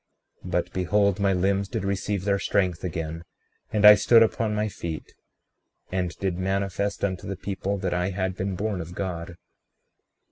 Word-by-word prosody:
36:23 -, -, -6 dB
But -, -, -1 dB
behold, 100 Hz, +2 st, +2 dB
my 100 Hz, -1 st, +3 dB
limbs 95 Hz, +2 st, +1 dB
did 110 Hz, -2 st, -3 dB
receive 100 Hz, 0 st, -2 dB
their 100 Hz, -1 st, +2 dB
strength 90 Hz, -5 st, 0 dB
again, 80 Hz, -2 st, -4 dB, 0.5 s
and 105 Hz, -1 st, +2 dB
I 105 Hz, -, +12 dB
stood 115 Hz, +3 st, +6 dB
upon 110 Hz, -1 st, 0 dB
my 105 Hz, 0 st, 0 dB
feet, 85 Hz, -5 st, -6 dB, 0.8 s
and 90 Hz, -1 st, 0 dB
did 95 Hz, -2 st, -2 dB
manifest 100 Hz, +1 st, -1 dB
unto 95 Hz, -2 st, -4 dB
the 100 Hz, -1 st, -4 dB
people 100 Hz, +1 st, -3 dB
that 95 Hz, -2 st, -2 dB
I 90 Hz, +1 st, 0 dB
had 95 Hz, -1 st, -2 dB
been 95 Hz, 0 st, -2 dB
born 100 Hz, -1 st, -2 dB
of 85 Hz, +2 st, -8 dB
God. 85 Hz, -3 st, -4 dB
95 Hz, 170 wpm, -25 LUFS, 90-100 Hz, 0.8 s, I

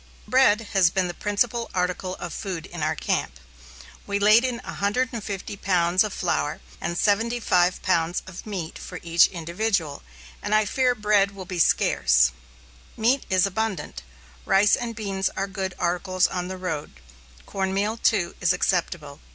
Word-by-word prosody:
Bread 255 Hz, -4 st, +4 dB
has 190 Hz, -4 st, +5 dB
been 185 Hz, +1 st, 0 dB
the 175 Hz, -, -5 dB
principal 230 Hz, +5 st, -1 dB
article 180 Hz, 0 st, -1 dB
of 175 Hz, -3 st, -7 dB
food 180 Hz, -5 st, -5 dB
in 175 Hz, -2 st, -8 dB
our 155 Hz, +1 st, 0 dB
camp. 70 Hz, -, -2 dB, 0.7 s
We 200 Hz, -, 0 dB
laid 215 Hz, +4 st, +5 dB
in 250 Hz, -2 st, -1 dB
150 210 Hz, -2 st, -3 dB
pounds 180 Hz, -1 st, +2 dB
of 215 Hz, -, -3 dB
flour 75 Hz, -, -1 dB, 0.2 s
and 170 Hz, +1 st, -3 dB
75 205 Hz, -4 st, +1 dB
pounds 170 Hz, -2 st, +1 dB
of 185 Hz, -1 st, -9 dB
meat 180 Hz, -6 st, -5 dB
for 180 Hz, -, -8 dB
each 170 Hz, 0 st, +5 dB
individual, 170 Hz, -2 st, -2 dB, 0.4 s
and 205 Hz, +1 st, 0 dB
I 215 Hz, 0 st, +3 dB
fear 250 Hz, +3 st, +1 dB
bread 205 Hz, -2 st, +2 dB
will 190 Hz, -1 st, -8 dB
be 180 Hz, -1 st, -5 dB
scarce. 65 Hz, -, +3 dB, 0.7 s
Meat 245 Hz, +5 st, +1 dB
is 185 Hz, -1 st, +3 dB
abundant. 195 Hz, -, -3 dB, 0.4 s
Rice 200 Hz, +2 st, +4 dB
and 235 Hz, -1 st, -5 dB
beans 195 Hz, -3 st, -2 dB
are 195 Hz, -, 0 dB
good 190 Hz, -1 st, -4 dB
articles 180 Hz, +1 st, +1 dB
on 180 Hz, -1 st, -2 dB
the 185 Hz, 0 st, -6 dB
road; 160 Hz, -5 st, -4 dB, 0.5 s
cornmeal, 195 Hz, +2 st, -1 dB
too, 190 Hz, -6 st, +1 dB
is 180 Hz, 0 st, +3 dB
acceptable. 170 Hz, -5 st, -1 dB
190 Hz, 150 wpm, -24 LUFS, 175-210 Hz, 0.7 s, has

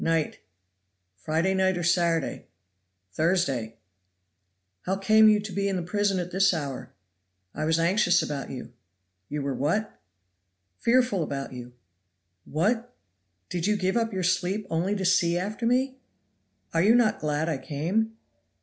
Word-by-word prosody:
"Night." 165 Hz, -2 st, 0 dB, 0.8 s
"Friday 160 Hz, -, 0 dB
night, 190 Hz, -1 st, +2 dB
or 175 Hz, -, -3 dB
Saturday?" 170 Hz, -2 st, +1 dB, 0.6 s
"Thursday." 140 Hz, -, 0 dB, 1.1 s
"How 190 Hz, -, +1 dB
came 215 Hz, +2 st, +5 dB
you 210 Hz, -1 st, +4 dB
to 210 Hz, 0 st, -7 dB
be 200 Hz, 0 st, -1 dB
in 195 Hz, -, -1 dB
the 180 Hz, -, -2 dB
prison 200 Hz, +2 st, 0 dB
at 180 Hz, 0 st, -3 dB
this 195 Hz, 0 st, +3 dB
hour?" 140 Hz, -5 st, -5 dB, 0.6 s
"I 155 Hz, -, -3 dB
was 160 Hz, +1 st, +2 dB
anxious 175 Hz, +1 st, +3 dB
about 140 Hz, -2 st, -4 dB
you." 130 Hz, -2 st, -8 dB, 0.6 s
"You 150 Hz, -1 st, -3 dB
were 140 Hz, -1 st, -1 dB
what?" 170 Hz, +12 st, -1 dB, 0.8 s
"Fearful 245 Hz, -5 st, +2 dB
about 140 Hz, -3 st, -4 dB
you." 125 Hz, -1 st, -9 dB, 0.7 s
"What! 225 Hz, +9 st, -1 dB, 0.5 s
did 175 Hz, +1 st, -2 dB
you 210 Hz, 0 st, +2 dB
give 190 Hz, +1 st, 0 dB
up 230 Hz, -1 st, +1 dB
your 190 Hz, -2 st, -2 dB
sleep 180 Hz, +3 st, 0 dB
only 175 Hz, +5 st, 0 dB
to 195 Hz, -2 st, -2 dB
see 175 Hz, -1 st, +3 dB
after 210 Hz, +5 st, -2 dB
me?" 260 Hz, +2 st, +1 dB, 0.7 s
"Are 165 Hz, -, +3 dB
you 215 Hz, +6 st, +5 dB
not 240 Hz, -3 st, +3 dB
glad 150 Hz, +1 st, -1 dB
I 155 Hz, -5 st, -1 dB
came?" 175 Hz, +12 st, -2 dB
180 Hz, 150 wpm, -26 LUFS, 160-210 Hz, 1.1 s, came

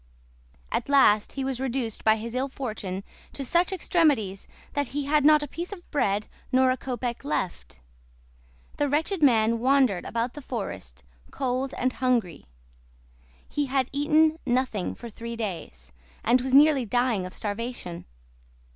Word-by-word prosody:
At -, -, -2 dB
last 215 Hz, -7 st, +4 dB
he 270 Hz, -, -3 dB
was 265 Hz, -2 st, -2 dB
reduced 255 Hz, -4 st, -2 dB
by 220 Hz, 0 st, +5 dB
his 225 Hz, +1 st, -6 dB
ill 260 Hz, +2 st, 0 dB
fortune 215 Hz, -8 st, -5 dB, 0.3 s
to 275 Hz, -, -4 dB
such 345 Hz, +8 st, +2 dB
extremities 290 Hz, -, +1 dB, 0.3 s
that 285 Hz, -2 st, 0 dB
he 290 Hz, -, -1 dB
had 295 Hz, +1 st, +3 dB
not 300 Hz, 0 st, +6 dB
a -, -, -4 dB
piece 340 Hz, +7 st, -6 dB
of 360 Hz, -4 st, -9 dB
bread 210 Hz, -7 st, 0 dB, 0.2 s
nor 260 Hz, 0 st, +4 dB
a -, -, +1 dB
kopek 245 Hz, -2 st, -4 dB
left. 175 Hz, -, -3 dB, 1.0 s
The 290 Hz, -1 st, +1 dB
wretched 320 Hz, +5 st, 0 dB
man 230 Hz, -4 st, +4 dB
wandered 260 Hz, -6 st, +3 dB
about 235 Hz, +1 st, -2 dB
the 295 Hz, -, -8 dB
forest, 95 Hz, -, -6 dB, 0.3 s
cold 260 Hz, 0 st, -2 dB
and 255 Hz, 0 st, 0 dB
hungry; 235 Hz, -, -1 dB, 1.0 s
he 290 Hz, -1 st, -1 dB
had 265 Hz, -1 st, 0 dB
eaten 310 Hz, +3 st, +3 dB
nothing 250 Hz, -6 st, -1 dB
for 240 Hz, -, -9 dB
three 230 Hz, +1 st, -7 dB
days, 165 Hz, -, -6 dB, 0.3 s
and 245 Hz, +2 st, +4 dB
was 260 Hz, +1 st, -3 dB
nearly 290 Hz, -2 st, +6 dB
dying 235 Hz, -4 st, 0 dB
of -, -, -10 dB
starvation. 210 Hz, -4 st, -5 dB
255 Hz, 150 wpm, -26 LUFS, 220-280 Hz, 1.0 s, not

